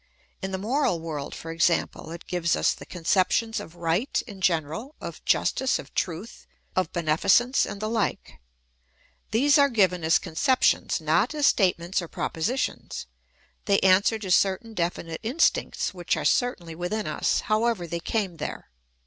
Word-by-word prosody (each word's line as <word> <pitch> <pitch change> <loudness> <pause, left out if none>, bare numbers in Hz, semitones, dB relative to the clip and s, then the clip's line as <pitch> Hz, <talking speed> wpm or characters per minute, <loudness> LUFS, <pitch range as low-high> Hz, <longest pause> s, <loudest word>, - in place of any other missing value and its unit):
In 190 - -3
the 190 - -3
moral 220 - 0
world, 155 -3 -5
for 165 - -7
example, 170 -1 0
it 170 +1 -8
gives 175 -2 0
us - - +2
the - - -12
conceptions 185 +6 +1
of 165 - -10
right 175 +8 0
in 200 -5 -11
general, 170 - -1
of - - -8
justice, 265 0 +2
of - - -11
truth, 180 +5 -4 0.3
of 185 -3 0
beneficence, 190 - +3
and 200 - -6
the 215 - -2
like. 225 -2 -2 0.9
These 285 +6 +4
are 280 0 +5
given 185 -7 +2
as 160 +1 +4
conceptions, 255 - +1
not - - +1
as 295 -1 +1
state 190 -8 +4
ments 170 +3 -2
or 170 - -6
propositions; 175 +12 -3 0.6
they 200 -2 +3
answer 190 +4 +4
to 200 -4 -5
certain 195 +5 +2
definite 170 -3 -3
instincts, 260 +9 0
which 175 -1 -1
are - - -3
certainly 185 -10 0
within 180 +6 -3
us, - - 0
however 215 -3 0
they 170 0 -4
came 190 -1 -2
there. 150 - -6
185 Hz, 155 wpm, -26 LUFS, 170-225 Hz, 0.9 s, are